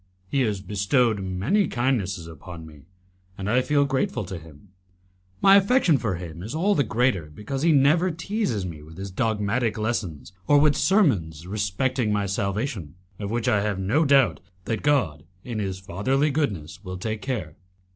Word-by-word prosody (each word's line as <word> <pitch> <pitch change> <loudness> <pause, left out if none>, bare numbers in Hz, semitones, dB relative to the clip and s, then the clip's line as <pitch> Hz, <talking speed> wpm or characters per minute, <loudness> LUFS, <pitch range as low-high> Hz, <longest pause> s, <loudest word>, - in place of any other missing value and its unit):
He 135 +8 0
has 105 -6 0
bestowed 105 +3 +1
many 95 - +1
kindnesses 105 -8 -1
upon 80 +1 -10
me, 75 -1 -15 0.5
and 95 - -4
I 120 +4 +3
feel 145 +2 +2
grateful 135 -1 -1
to 95 - -6
him; 80 +3 -16 0.7
my 195 0 +8
affection 200 - +3
for 105 -6 -1
him 85 -1 -8
is 110 +9 -6
all 190 +6 +2
the 145 - +2
greater 110 - +1
because 105 - -5
he 165 +2 +4
never 155 +6 +4
teases 165 - -2
me 80 -4 -7
with 80 +2 -13
his 95 0 -6
dogmatic 110 +3 0
lessons 100 - -3
or 145 - +6
with 145 0 +4
sermons 95 - +2
respecting 105 +4 -1
my 105 -1 +1
salvation, 100 - -3 0.2
of 100 -1 -4
which 115 +1 -1
I 105 - +3
have 105 -1 -1
no 110 +12 +2
doubt 135 -4 +4 0.3
that 115 - -2
God, 125 - +1 0.2
in 120 -3 -4
His 95 -2 -2
fatherly 130 - 0
goodness, 105 - -2
will 95 -1 -6
take 110 +3 -4
care. 105 - -4
105 Hz, 170 wpm, -25 LUFS, 95-135 Hz, 0.7 s, my